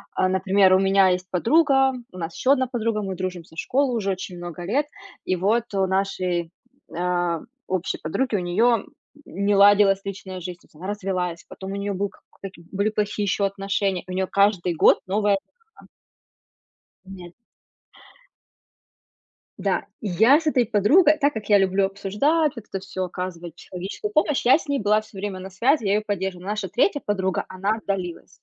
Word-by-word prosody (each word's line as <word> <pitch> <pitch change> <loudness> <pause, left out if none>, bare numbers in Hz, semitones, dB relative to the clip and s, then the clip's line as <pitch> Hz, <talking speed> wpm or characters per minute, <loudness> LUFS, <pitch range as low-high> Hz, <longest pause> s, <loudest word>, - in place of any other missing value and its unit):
А, 185 - +2
например, 190 0 +3
у 185 - +5
меня 195 0 +4
есть 185 0 -1
подруга, 270 - +3 0.2
у - - -12
нас 165 -1 -5
еще 260 - +2
одна 260 -2 0
подруга, 230 -3 -1
мы 190 -1 -4
дружим 185 -1 -4
со 160 - -19
школы 260 +5 0
уже 200 -4 -1
очень 185 -1 -6
много 175 0 -7
лет, 270 +11 0 0.4
и 185 - +1
вот 210 +6 +1
у 195 -1 +2
нашей, 185 -3 -1 0.4
а, 175 -1 0 0.3
общей 185 -1 -2
подруги, 220 +10 -1
у - - +1
нее 215 +6 +2 0.4
не 200 +3 0
ладилась 200 -1 +5
личная 190 -1 -7
жизнь. 175 0 -7
То - - -23
есть - - -28
она 175 +5 -8
развелась, 185 -4 -3
потом 190 0 -8
у - - -4
нее 200 0 -2
был 200 +1 -2
как 195 - -23
к - - -28
каки 190 -3 -9
были 200 +2 0
плохие 210 -1 -2
еще 200 0 +1
отношения, 195 -1 -1
и 185 - -10
у - - -4
нее 190 0 -1
каждый 200 -4 +2
год - - +5
новая 205 +1 +2
эха. 195 - -10 1.5
Нет. 180 -2 -11 2.3
Да, - - -1 0.2
я 220 - +4
с 320 - -5
этой 255 -5 +3
подругой, 285 - +4
так 285 +1 +2
как 215 -2 -6
я 205 - +7
люблю 195 0 +2
обсуждать, 210 +12 0
вот 225 - -8
это 195 - -4
всё, 185 -1 -4
оказывать 175 -2 -6
человеческую 190 - -6
помощь, 305 -6 +1
я 255 - +7
с 320 - -11
ней 280 -1 0
была 210 +1 +3
всё 215 -2 -13
время 195 -1 -4
на 190 +1 -8
связи, 230 +7 +1
я 195 - +2
её 210 - +2
поддерживала. 190 -3 -3
Но - - -3
наша 210 -2 -3
3 255 - +1
подруга, 190 -3 -1
она 195 +3 -1
отдалилась. 190 -5 -4
195 Hz, 185 wpm, -23 LUFS, 185-215 Hz, 2.3 s, я